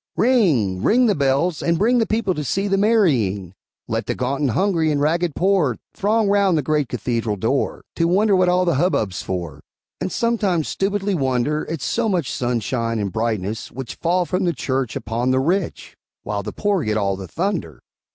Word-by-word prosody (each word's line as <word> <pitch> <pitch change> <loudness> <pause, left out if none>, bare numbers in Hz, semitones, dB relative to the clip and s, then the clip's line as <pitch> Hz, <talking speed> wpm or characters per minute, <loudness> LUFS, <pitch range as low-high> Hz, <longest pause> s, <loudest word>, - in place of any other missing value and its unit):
Ring! 155 - +2
ring 245 - +4
the 215 - +3
bells, 140 +3 +1
and 170 0 +1
bring 240 +6 +3
The 225 - +1
people 215 -3 0
to 150 - -4
see 195 +8 -1
the 195 - +2
marrying! 135 - +2 0.3
Let - - -2
the - - -1
gaunt 135 +3 -2
and 140 - +2
hungry 165 - +1
and 145 - 0
ragged 165 +2 0
poor 180 - +2 0.2
Throng 215 +2 +1
round 200 -3 +3
the 150 - 0
great 150 -2 0
cathedral 115 -2 -2
door, 115 +8 -1
To 165 - +2
wonder 200 +3 +3
what 185 -1 +3
all 180 +1 +2
the 170 - +2
hubbub's 110 - 0
for, 85 -6 -5 0.4
And 185 - -3
sometimes 205 -9 0
stupidly 200 +1 -1
wonder 135 0 0
At 160 -4 -4
so 230 -1 0
much 175 -9 0
sunshine 115 -1 -1
and 100 -4 -3
brightness 110 -1 -2
which 130 -1 -6
Fall 175 +2 0
from 185 +1 -1
the 170 - +1
church 130 -4 -2
upon 120 +2 -2
the 130 0 +3
rich, 175 +6 -2 0.3
While 105 -1 -3
the 105 +1 -6
poor 200 - 0
get 110 0 0
all 100 -2 0
the 95 -1 -8
thunder. 170 - -3
155 Hz, 190 wpm, -21 LUFS, 120-195 Hz, 0.4 s, ring